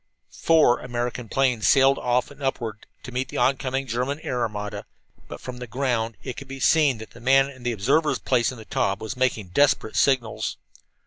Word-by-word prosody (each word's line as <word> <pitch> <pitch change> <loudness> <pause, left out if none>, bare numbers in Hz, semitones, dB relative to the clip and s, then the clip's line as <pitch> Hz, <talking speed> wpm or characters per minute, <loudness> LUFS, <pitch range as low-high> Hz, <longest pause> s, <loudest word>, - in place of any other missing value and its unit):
Four 160 -7 +4
American 120 -1 -4
planes 125 -5 +1
sailed 135 0 +5
off 125 +2 0
and 145 0 -15
upward 115 -5 -3 0.2
to 125 - -8
meet 125 +1 -2
the - - -6
oncoming 135 0 0
German 125 +4 -2
air 125 -4 -2
armada. 105 -2 -4 0.4
But - - -8
from 125 -1 -7
the 125 0 -7
ground 115 -3 -1
it 130 -3 -6
could 140 - -8
be 135 0 -8
seen 145 -3 +4
that 110 0 -10
the 115 - -14
man 135 +2 +4
in 130 -2 -15
the 120 0 -1
observer's 140 +9 +1
place 125 -1 +1
in 130 - -10
the 110 - -11
Taube 95 +1 -1
was 110 -3 -5
making 125 -7 0
desperate 135 0 +2
signals. 130 -5 +1
125 Hz, 195 wpm, -24 LUFS, 115-135 Hz, 0.4 s, sailed